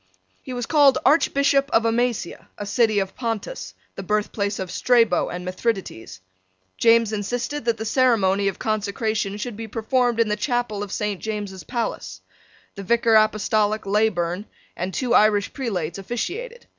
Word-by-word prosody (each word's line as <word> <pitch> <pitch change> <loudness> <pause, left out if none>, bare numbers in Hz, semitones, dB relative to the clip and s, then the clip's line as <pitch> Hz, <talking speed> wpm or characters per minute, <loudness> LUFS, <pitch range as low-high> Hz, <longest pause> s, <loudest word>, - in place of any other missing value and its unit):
He - - -9
was 245 -1 -3
called 285 -3 +5
Archbishop 280 -1 +3
of 225 -3 +2
Amasia, 230 -5 -1
a 205 - -5
city 215 +1 +2
of 195 -1 -1
Pontus, 230 - -4 0.2
the - - -7
birthplace 205 0 -1
of 185 -1 -5
Strabo 230 -5 +2
and 180 +1 -6
Mithridates. 185 - -4 0.5
James 230 -1 +4
insisted 240 +6 -3
that 230 -1 +1
the 220 - -5
ceremony 210 -6 +2
of 195 - -2
consecration 215 -1 -2
should 225 +1 -5
be 225 +1 -6
performed 235 +2 0
in 230 - +3
the 210 - 0
chapel 240 -2 -2
of 205 -2 -5
Saint 205 -2 -2
James's 205 -3 -5
Palace. 235 -2 -4 0.5
The 200 - -8
Vicar 230 +3 +2
Apostolic 215 0 +2
Leyburn 195 -2 0 0.3
and 185 +2 -3
two 250 +4 -1
Irish 210 -1 +3
prelates 195 - -3
officiated. 415 - -5
220 Hz, 150 wpm, -23 LUFS, 200-240 Hz, 0.5 s, called